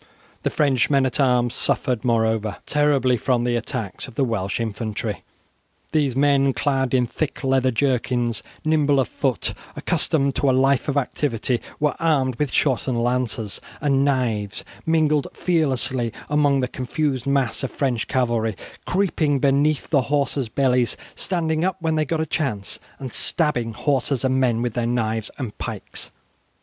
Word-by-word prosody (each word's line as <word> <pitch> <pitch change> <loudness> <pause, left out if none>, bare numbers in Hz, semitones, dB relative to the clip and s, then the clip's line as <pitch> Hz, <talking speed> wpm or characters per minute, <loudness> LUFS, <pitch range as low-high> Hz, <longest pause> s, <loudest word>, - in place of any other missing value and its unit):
The - - 0
French 135 -5 +2
men 135 -2 +3
at 130 - -2
arms 125 -3 +3
suffered, 125 -4 0
moreover, 110 -3 +1
terribly 140 -4 +2
from 120 +1 +1
the 120 0 +1
attacks 115 -3 -4
of 130 - -13
the 140 - +2
Welsh 105 -6 -1
infantry. 110 -1 -3 0.7
These 145 -5 +1
men, 140 -1 +3
clad 135 -3 0
in 125 -1 +3
thick 140 +5 -4
leather 130 -1 +3
jerkins, 120 -2 0 0.2
nimble 150 -3 +3
of 130 - +2
foot, 130 -8 -1 0.2
accustomed 140 -3 +1
to 140 - +2
a - - +4
life 135 0 +3
of 145 -1 0
activity, 125 -3 -1 0.2
were 150 -1 +2
armed 135 -7 +1
with 145 -4 -1
shortened 130 -3 +1
lances 120 -4 -1 0.2
and 140 -2 +2
knives, 115 -7 0 0.2
mingled 155 -3 +2
fearlessly 130 -8 +1 0.2
among 145 -2 +3
the 125 - 0
confused 130 +1 -2
mass 135 -6 +1
of 135 - -2
French 125 -6 -1
cavalry, 115 -4 0 0.3
creeping 170 -6 +1
beneath 140 +2 +2
the 140 -4 +4
horses' 140 -2 -1
bellies, 125 -1 +1 0.2
standing 160 -3 -1
up 190 +1 0
when 160 -2 0
they 155 -1 +1
got 160 +2 -1
a 160 - 0
chance, 115 - -2 0.2
and 130 -3 -7
stabbing 125 -9 0
horses 135 +1 0
and 130 0 +2
men 120 -3 +2
with 120 -2 -2
their 120 -1 -1
knives 110 -2 -1
and 125 -7 -5
pikes. - - -5
130 Hz, 155 wpm, -22 LUFS, 120-145 Hz, 0.7 s, a